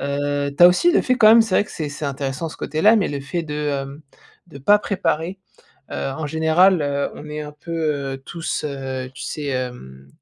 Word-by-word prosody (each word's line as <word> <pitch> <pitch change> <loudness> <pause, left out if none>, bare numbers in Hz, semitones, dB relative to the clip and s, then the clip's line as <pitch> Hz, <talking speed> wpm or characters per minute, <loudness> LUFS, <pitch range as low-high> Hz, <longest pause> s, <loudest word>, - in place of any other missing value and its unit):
heu, 140 0 -2
tu - - +3
as - - +11
aussi 340 - +3
le - - +3
fait 255 - +2
quand 220 - +5
même 225 +1 +8
c'est 220 -4 -3
vrai - - +3
que - - -15
c'est 155 -2 -4
c'est 145 +2 -7
intéressant 140 +3 -3
ce - - -11
côté-là 205 +9 +3
mais 200 - +1
le 145 - -3
fait 165 +5 -3
de, 150 -2 -6
hem, 140 -1 -3 0.4
de 155 -5 -12
pas 205 +9 +5
préparer, 185 -2 -2 0.5
heu, - - -6 0.2
en 160 - -3
général, 160 +4 +3
heu, 140 0 -1
on 150 - -10
est 150 0 -5
un 150 - -8
peu, 150 +3 -10 0.4
heu, - - -7
tous, 170 -1 -4
heu, 130 -3 -5
tu - - -9
sais, 150 -1 -5
hem, 125 - -5
150 Hz, 225 wpm, -21 LUFS, 140-175 Hz, 0.5 s, as